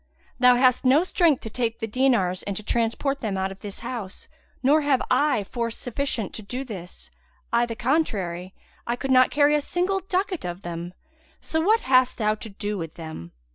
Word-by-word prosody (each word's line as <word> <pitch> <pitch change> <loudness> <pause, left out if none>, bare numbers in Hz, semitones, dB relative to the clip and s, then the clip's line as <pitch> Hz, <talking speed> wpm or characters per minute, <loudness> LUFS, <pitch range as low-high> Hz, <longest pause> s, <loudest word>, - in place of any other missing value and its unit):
Thou 250 0 +7
hast 255 0 +3
no 270 +6 +5
strength 340 -6 +2
to 225 - -6
take 230 -1 -1
the 225 - -3
dinars 225 -6 +1
and 200 -2 -4
to 215 - -6
transport 235 +6 0
them 205 -4 -2
out 190 0 -1
of 195 - -10
this 200 -1 -8
house, 220 -7 -6 0.4
nor 295 +4 +5
have 285 -3 +2
I 255 -4 +3
force 230 +2 -4
sufficient 245 -3 -3
to - - -5
do 250 +6 -5
this; 190 -8 -9 0.4
I 235 0 +3
the 230 - -5
contrary, 195 - -1 0.3
I 235 - 0
could 270 +2 -3
not 255 0 +6
carry 290 0 +4
a 300 - +3
single 365 +6 0
ducat 375 -1 -2
of 175 +2 -5
them; 175 +1 -6 0.4
so 320 - -1
what 435 +7 +3
hast 255 -1 +3
thou 215 -2 +2
to 220 +1 -8
do 205 0 -4
with 165 -2 -6
them?" 160 - -8
240 Hz, 195 wpm, -25 LUFS, 200-275 Hz, 0.4 s, Thou